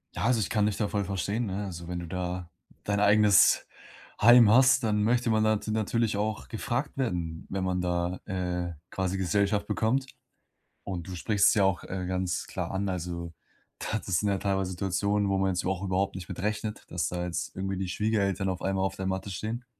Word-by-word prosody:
Ja, - - -2
also, 115 -1 +3
ich 105 - -1
kann 105 -1 +2
dich 100 - -1
da 105 - 0
voll 100 0 -1
verstehen, 100 +4 -2
ne? 100 +1 -3
Also, 85 -2 -7
wenn 90 - -4
du 85 - -5
da 90 0 -4 0.4
dein 100 0 0
eigenes 105 -1 +5 0.6
Heim 120 +1 +8
hast, 130 +4 +6
dann 105 -2 +1
möchte 120 +1 +2
man 110 0 +3
da 110 0 +3
nat 105 - -6
natürlich 110 0 0
auch 110 0 -2
gefragt 120 +5 -3
werden, 85 -10 -2
wenn 95 -1 -2
man 90 -1 0
da, 90 0 -1
äh, 90 -3 -2 0.2
quasi 95 0 -1
Gesellschaft 100 +3 +1
bekommt. 130 +5 0 0.8
Und 90 -4 -5
du 95 - -5
sprichst 100 +3 +3
es - - +4
ja 100 - +3
auch, 95 -3 +1
äh, 95 -1 -4
ganz 90 -1 -2
klar - - -4
an. 95 0 -1
also, 85 -1 -4 0.5
da 110 - -2
das 95 -4 -1
sind 105 - 0
ja 100 - +2
teilweise 95 -1 -1
Situationen, 100 +2 0
wo 95 - +1
man 95 0 +2
jetzt 90 -1 0
überhau 95 +1 -2
überhaupt 95 +1 0
nicht 90 -2 -7
mit - - -6
rechnet, 105 +1 -3
dass 90 - -1
da 90 0 -3
jetzt 90 -1 -4
irgendwie 95 0 -2
die 95 -1 -2
Schwiegereltern 100 -1 0
auf 90 - -4
einmal 95 0 0
auf 95 0 -2
der 95 - -4
Matte 95 +1 -2
stehen. 110 +6 -4
95 Hz, 210 wpm, -28 LUFS, 90-105 Hz, 0.8 s, Heim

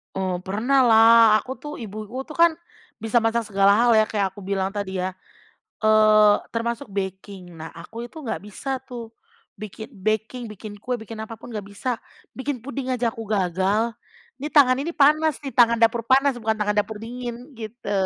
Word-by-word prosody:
Eee, 185 -2 -1
pernah 235 +9 +1
lah, 230 -1 +7 0.2
aku 250 +5 -6
tuh 295 0 -7
ibu-ibu 220 +4 -7
tuh 310 - -10
kan, 340 -1 +7 0.5
bisa 225 +1 +1
masak 225 0 0
segala 200 -1 +3
hal 240 0 +4
ya, 215 0 +5
kayak 195 -3 -1
aku 205 - -11
bilang 195 0 -2
tadi 195 -2 -4
ya, 185 0 -2 0.7
eee, 215 -1 +6 0.2
termasuk 235 +3 -2
baking. 190 -3 -6
Nah 160 - -7
aku 230 +8 -8
itu 310 +5 -11
nggak 230 - -3
bisa 265 +6 -4
tuh, 235 -3 -8 0.5
bikin 215 +3 -8
baking, 220 +3 -2
bikin 210 0 -9
kue, 250 +4 -3
bikin 220 -1 -7
apa 220 +1 -6
pun 230 - -12
nggak 210 -3 -6
bisa, 225 +4 -4 0.4
bikin 260 -3 -3
puding 275 0 -5
aja 240 -2 0
aku 225 -3 -8
gagal. 195 +3 +1 0.5
Nih, 295 +3 -6
tangan 260 -3 +6
ini 335 +5 -3
panas 305 +1 +3
nih, 275 - -5
tangan 235 -1 +4
dapur 230 0 +3
panas, 270 -1 +3
bukan 220 -1 0
tangan 210 -1 -1
dapur 210 +1 -2
dingin 245 +2 -7
gitu. 220 0 -7
225 Hz, 180 wpm, -23 LUFS, 205-250 Hz, 0.7 s, lah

